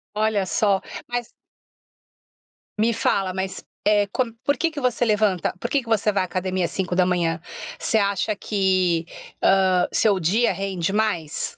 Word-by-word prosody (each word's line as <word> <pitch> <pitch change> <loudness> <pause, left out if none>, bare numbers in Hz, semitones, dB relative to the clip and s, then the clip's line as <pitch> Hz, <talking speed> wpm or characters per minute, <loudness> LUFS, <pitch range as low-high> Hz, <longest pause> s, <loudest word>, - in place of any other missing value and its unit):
Olha 215 -2 +1
só, 195 +1 +2 0.3
mas 240 -1 -3 1.5
Me 225 +2 +3
fala, 195 -4 0
mas, 190 0 -4 0.2
eh, 205 -1 +3
com 250 -3 -1
por 285 +2 +1
que 335 -1 0
que 300 -2 -6
você 245 -1 +1
levanta? 210 -4 +1
Por - - -3
que 280 -3 +1
que - - -19
você 215 -1 +2
vai 195 -2 +1
à - - -2
academia 185 0 -1
às - - -4
5h? 180 -2 0 0.4
Você 220 - 0
acha 200 +1 0
que, 185 -5 +1 0.4
hã, 185 -2 +4
seu 200 -4 +2
dia 205 +9 +2
rende 190 -2 -2
mais? 195 -8 -2
195 Hz, 155 wpm, -23 LUFS, 185-220 Hz, 1.5 s, hã